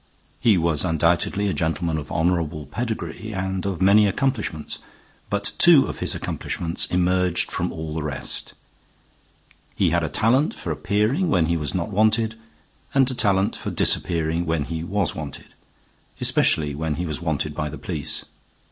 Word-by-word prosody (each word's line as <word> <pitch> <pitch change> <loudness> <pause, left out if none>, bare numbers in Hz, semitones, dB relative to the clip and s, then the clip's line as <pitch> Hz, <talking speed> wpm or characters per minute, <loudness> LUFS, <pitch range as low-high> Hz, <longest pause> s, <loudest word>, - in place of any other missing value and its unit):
He 110 -5 +4
was 80 -3 +1
undoubtedly 85 +4 +1
a 95 - 0
gentleman 80 -1 -1
of 75 - -9
honorable 80 -3 0
pedigree 110 - -4
and 95 -1 -2
of 95 -2 -2
many 105 +2 +6
accomplishments, 105 - -2 0.5
but 100 0 0
two 165 -6 +7
of - - -6
his - - 0
accomplishments 85 -1 -3
emerged 90 0 +1
from - - -2
all 80 -1 -5
the 80 - -2
rest. 75 -3 -3 1.2
He 90 -4 +2
had 85 0 +2
a 80 - -1
talent 120 - +2
for - - -4
appearing 110 - +1
when 90 - +3
he 85 +1 0
was 75 -2 -3
not 85 0 -1
wanted 110 +2 +2 0.6
and 135 -1 +4
a - - -2
talent 100 -4 +2
for - - -5
disappearing 85 0 +1
when 80 -2 0
he 80 +2 -4
was 95 0 0
wanted, 75 -2 -8 0.7
especially 75 -2 +2
when 75 +1 -2
he 90 - -3
was 80 -1 -4
wanted 75 -2 -1
by 75 +1 -3
the - - -7
police. - - -3
85 Hz, 160 wpm, -23 LUFS, 80-105 Hz, 1.2 s, two